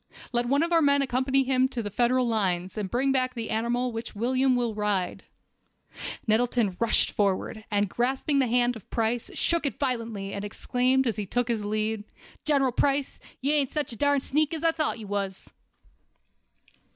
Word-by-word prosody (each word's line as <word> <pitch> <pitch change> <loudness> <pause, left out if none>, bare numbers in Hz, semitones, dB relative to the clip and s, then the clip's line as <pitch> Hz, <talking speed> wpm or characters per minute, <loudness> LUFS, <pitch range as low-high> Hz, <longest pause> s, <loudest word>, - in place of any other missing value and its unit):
Let 240 -1 0
one 280 +5 +3
of 340 +1 -1
our 330 - +5
men 280 -1 +4
accompany 265 +1 +1
him 260 -1 +1
near 260 - +5
to 245 -3 -4
the 205 - -5
Federal 245 +3 +2
lines, 190 -5 0
and 205 -3 -3
bring 265 +5 +1
back 255 -1 0
the 230 -2 -4
animal 240 +3 0
which 225 0 -6
William 255 +4 +2
will 240 -2 0
ride." 205 -4 -1 1.0
Nettleton 225 -3 +1
rushed 230 -1 +2
forward, 205 +2 -1
and 205 -1 +1
grasping 265 +6 0
the 260 - +3
hand 245 +1 +2
of 220 - -12
Price, 230 +1 -1
shook 335 -1 +1
it - - -4
violently, 230 -7 -2
and 200 - -4
then - - -5
exclaimed, 255 +5 +1
as 230 -5 -1
he 205 -2 -3
took 245 +3 -1
his 225 -3 0
leave: 215 +1 -1 0.4
"General 275 -4 +3
Price, 275 +2 0 0.2
you 280 +3 +2
ain't 285 -4 +2
such 300 -4 -2
a - - -6
darn 285 +3 +2
sneak 305 +4 0
as 320 - -6
I 330 - +5
thought 315 -6 -1
you 220 - -8
was!" 195 -1 -4
245 Hz, 190 wpm, -27 LUFS, 215-270 Hz, 1.0 s, our